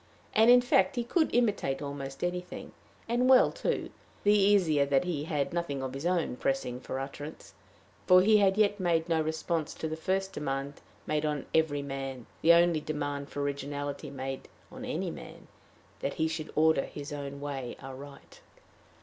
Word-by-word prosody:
And 220 +2 +5
in 245 0 +8
fact 195 -6 +3
he 240 - 0
could 315 +7 +1
imitate 210 - +1
almost 140 -1 -6
anything 180 0 -4 0.4
and 240 +2 +2
well, 260 -1 +7
too - - -2 0.3
the 205 - +5
easier 195 -8 +4
that 140 +1 +2
he 160 -5 -2
had 150 -4 -1
nothing 145 -6 -2
of 130 -1 -4
his 140 +5 -3
own 170 -8 0
pressing 125 -2 -1
for 130 - -5
utterance; 145 +3 -8 0.5
for 185 0 +7
he 215 +2 +6
had 195 -1 +3
yet 205 -1 +3
made 170 -3 +1
no 165 -2 +2
response 160 0 -2
to 160 - -4
the 160 - -3
first 190 +4 -1
demand 135 0 -4 0.2
made 150 0 0
on 150 -2 -1
every 150 -3 +2
man, 135 -3 -5 0.2
the 165 - +6
only 170 -1 +5
demand 145 -2 -3
for 145 - -3
originality 145 0 -4
made 135 -1 -5 0.2
on - - -8
any - - -2
man - - -11 0.5
that - - -3
he 160 - +1
should 160 -1 -5
order 160 -2 +3
his 145 +1 -8
own 140 -1 -6
way 135 -4 -5
aright. 135 +1 -11
155 Hz, 175 wpm, -30 LUFS, 140-180 Hz, 0.5 s, in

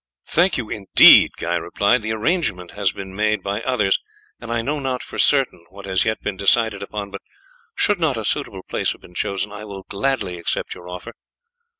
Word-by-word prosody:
"Thank 180 +4 +2
you 120 -4 -4
indeed," 100 -3 +7
Guy 85 +1 -2
replied; 100 +8 +1
"the 110 0 -3
arrangement 110 - -1
has 100 -2 0
been 95 -1 -9
made 105 +1 0
by 100 +2 -2
others, 110 -6 +1 0.4
and 115 - -8
I 115 -1 0
know 145 +4 -2
not 130 -2 -3
for - - -8
certain 135 -11 +2
what 100 +2 -12
has 95 -2 +1
yet 110 0 0
been 100 -2 -3
decided 105 +1 +2
upon, 100 0 -6
but 100 - -7 0.5
should 205 -3 +1
not 155 -7 +1
a 110 - -4
suitable 95 -2 -2
place - - -1
have - - -19
been 90 - -16
chosen 100 +3 -2
I 105 0 -8
will 100 -2 -8
gladly 100 -5 -2
accept 85 - -2
your 90 0 -12
offer." 90 0 -8
105 Hz, 200 wpm, -21 LUFS, 95-120 Hz, 0.5 s, indeed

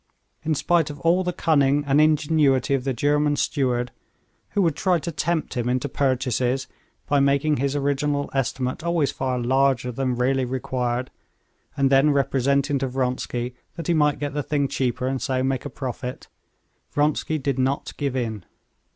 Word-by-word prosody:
In 155 0 0
spite 165 +1 +2
of 145 -1 -8
all 175 +3 +3
the 180 - -1
cunning 145 -4 +2
and 140 +1 +4
ingenuity 150 -3 +3
of 135 -1 0
the 135 - +1
German 145 +3 +1
steward, 125 -4 0 0.7
who 200 - +4
would 165 -4 +1
try 185 -2 +2
to 165 +2 -4
tempt 165 +1 -1
him 120 -2 -1
into 130 +3 0
purchases 130 -1 0 0.4
by 145 -1 +2
making 140 +2 +2
his 140 +2 -1
original 145 0 0
estimate 130 -1 -1
always 170 -4 +1
far 130 -1 -2
larger 130 0 +1
than 130 0 -1
really 130 +2 +1
required, 125 -1 -2 0.7
and 135 -1 +2
then 135 +2 +5
representing 140 0 +1
to 135 - -1
Vronsky 125 -1 -2 0.2
that 165 -2 -6
he 175 - +2
might 150 -2 +3
get 145 -1 -4
the 145 - -1
thing 140 -1 0
cheaper, 125 -1 -1
and 130 0 -1
so 130 -1 0
make 135 0 -1
a - - -3
profit, 125 -1 -6 0.6
Vronsky 150 +1 0
did 135 -2 -2
not 135 +2 -1
give 140 -3 -2
in. 110 -6 -2
135 Hz, 170 wpm, -24 LUFS, 130-145 Hz, 0.7 s, then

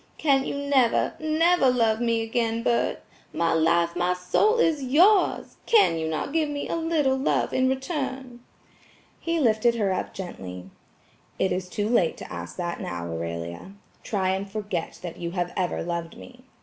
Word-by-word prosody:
"Can 275 -3 +2
you - - -3
never, 280 -4 +2
NEVER 315 -1 +3
love 230 -2 +2
me 230 -1 +1
again, 230 0 -1
Bert? 235 -1 0 0.3
My 165 0 +1
life, 170 +1 +2
my 180 +1 +1
soul 420 - +2
is 320 -10 +2
yours! 355 +11 +3
Can 425 - +5
you 160 - -2
not 160 - -3
give 315 -2 +1
me 290 -1 -4
a - - -2
little 320 -5 +1
love 265 +1 0
in 260 0 +2
return?" 265 -3 -4 0.8
He 335 0 -1
lifted 235 -2 +3
her 200 -4 +1
up - - -4
gently. 95 - -8 0.7
"It 190 - +1
is 180 0 -2
too 205 +2 -2
late 205 -8 +2
to - - -9
ask 85 0 -7
that 175 -1 -4
now, 85 -1 -4
Aurelia. 85 - -5 0.3
Try 190 -3 -1
and 190 +1 -2
forget 205 -5 -4
that 175 -2 -6
you 170 0 -5
have 175 0 -1
ever 180 -2 -1
loved 170 -1 -4
me. 250 0 -14
225 Hz, 170 wpm, -25 LUFS, 175-270 Hz, 0.8 s, Can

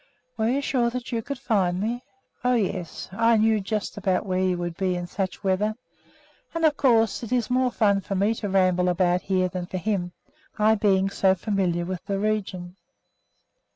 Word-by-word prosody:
"Were 220 0 0
you 270 +3 +1
sure 250 -4 +1
that 250 +1 -6
you 230 -2 -1
could 280 +4 -5
find 190 -8 0
me?" 235 +4 -2 0.4
"Oh, 250 0 +3
yes! 185 -6 -2
I 230 +3 +3
knew 220 -1 +3
just 210 +1 -3
about 190 -1 0
where 185 -1 0
you 185 -1 +1
would 175 -1 -4
be 185 0 0
in 175 0 -3
such 185 +1 -4
weather. 200 +3 +1 0.8
And, 330 -1 +1
of 300 -2 +4
course, 225 -7 +3
it 235 - -7
is 245 -2 0
more 255 0 +3
fun 200 -4 +2
for 195 - -4
me 200 +4 +2
to 210 -2 -4
ramble 185 -1 +3
around 180 0 +2
here 185 -1 +1
than 180 -1 -5
for 185 - -4
him, 180 -2 -2 0.4
I 215 +1 +4
being 195 -2 +2
so 190 -1 +3
familiar 180 -3 -1
with 185 -1 -5
the 200 -1 -1
region." 195 -4 -2
195 Hz, 190 wpm, -25 LUFS, 185-225 Hz, 0.8 s, of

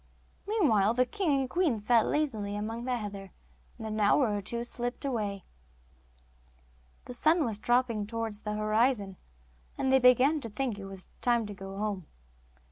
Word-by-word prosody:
Meanwhile 235 - +3
the 255 +1 +3
king 380 +2 -1
and 265 - -2
queen 310 -6 +1
sat 225 +2 +3
lazily 220 -10 -1
among 225 +3 -4
the 250 -1 0
heather, 200 -3 -7 0.5
and 225 - -7
an 215 0 -3
hour 210 +2 +3
or 205 - -2
two 235 +5 -4
slipped 245 +2 -4
away. 210 -7 -2 1.6
The 250 - -7
sun 310 +6 +3
was 220 -3 -2
dropping 240 -3 +1
towards 225 -2 -4
the 210 - -3
horizon, 215 -2 +1 0.6
and 265 - 0
they 265 - +6
began 255 +5 +5
to 230 - -6
think 230 -1 -3
it 195 - -7
was 195 -1 -8
time 240 -2 +2
to 205 - -6
go 195 0 -8
home. 200 -5 -3
225 Hz, 165 wpm, -30 LUFS, 205-255 Hz, 1.6 s, they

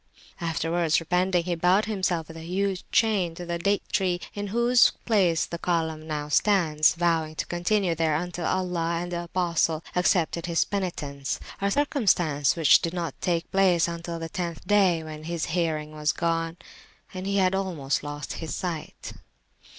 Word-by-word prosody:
Afterwards 165 -1 +1
repenting, 180 +1 +1
he 175 0 -2
bound 180 +5 +3
himself 185 -6 -1
with 165 - -11
a - - -7
huge 185 +2 -2
chain 200 -7 +2
to 175 - -7
the 170 0 -3
date 200 +3 +1
tree 180 -2 +1
in 205 0 -4
whose 235 +3 +4
place 185 -8 +2
the 170 - -6
column 160 -3 -1
now 150 -1 -3
stands, 155 -3 +3
vowing 165 -2 0
to - - -2
continue 175 +1 0
there 160 -2 +1
until 175 +1 -3
Allah 175 -3 -1
and 175 - -6
the 175 0 -3
Apostle 170 -2 0
accepted 175 -2 +1
his 170 -1 +2
penitence 145 -8 -3 0.2
a 200 - +2
circumstance 185 - +2
which 165 -3 +5
did 165 +1 -3
not 170 -2 -3
take 170 -2 -1
place 185 -4 +4 0.2
till 170 0 -5
the 165 0 -5
tenth 170 -1 -5
day, 190 -6 +3
when 155 0 -8
his 170 -1 -2
hearing 160 -3 -1
was 150 0 0
gone 165 0 -1 0.6
and 185 +1 -5
he 200 0 0
had 185 -1 +3
almost 170 -8 -1
lost 145 0 -5
his 160 - -4
sight. 170 -5 -5
170 Hz, 165 wpm, -26 LUFS, 160-185 Hz, 0.6 s, which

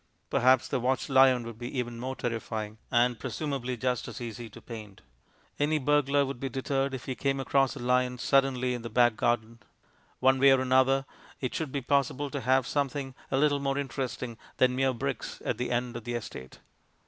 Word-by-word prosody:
Perhaps 130 +1 +3
a - - +2
watchlion 130 0 +3
would 115 -1 -8
be 120 +2 -5
even 120 -1 -3
more 130 +2 -4
terrifying 110 -3 -4
and, 120 -1 +2
presumably, 135 -5 -3
just 125 0 -1
as - - -7
easy 120 -1 -6
to - - -12
paint. 105 -4 -10 0.6
Any 150 +2 +2
burglar 145 0 +2
would 135 -2 -5
be 135 - -3
deterred 135 +1 -1
if 125 - -8
he 130 - -2
came 135 +1 -1
across 135 0 +2
a - - -7
lion 125 0 +1
suddenly 130 -1 +2
in 120 - -4
the 115 - -6
back 120 0 +4
garden. 115 0 0 0.6
One 130 +1 +4
way 135 0 +7
or 130 - +3
another, 130 +1 +3 0.3
it 130 - -3
should 155 -4 -3
be 140 - -2
possible 140 +1 0
to 140 - -3
have 130 +1 +3
something 140 -1 -2 0.2
a 135 - +1
little 145 0 +3
more 135 0 -1
interesting 130 -3 -4 0.2
than 125 -1 +3
mere 135 0 +2
bricks 115 - -4
at - - -1
the 125 - -1
end 120 0 -1
of 120 - -6
the 120 +1 -3
estate. 65 - -7
130 Hz, 195 wpm, -29 LUFS, 120-135 Hz, 0.6 s, way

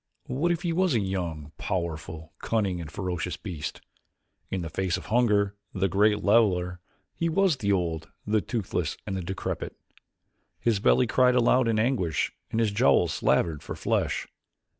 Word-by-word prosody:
What 150 +8 0
if 170 +1 -1
he 170 -2 0
was 180 -4 +2
a - - +3
young, 85 -6 -3
powerful, 80 -3 -4
cunning, 100 -6 0
and 80 - -7
ferocious 90 0 -3
beast? 85 -8 -6 0.7
In 95 - -2
the 80 - -4
face 90 +2 0
of - - -9
hunger, 105 -4 +2 0.2
the 95 0 +2
great 105 +2 +2
leveler, 90 -5 +3 0.3
he 165 - -1
was 195 +3 +3
as 145 - 0
the 100 -5 0
old, 85 -5 -1 0.2
the 105 0 +2
toothless, 90 - -2
and 100 - -3
the 95 - -2
decrepit. 95 +2 -4 0.8
His 115 -4 +1
belly 125 - +4
cried 125 +1 +3
aloud 125 0 +4
in 115 -1 +2
anguish 110 - +1 0.2
and 115 - -1
his 110 -3 +2
jowls 100 -6 +3
slavered 80 -3 +1
for - - -6
flesh. - - -1
100 Hz, 165 wpm, -27 LUFS, 90-115 Hz, 0.8 s, belly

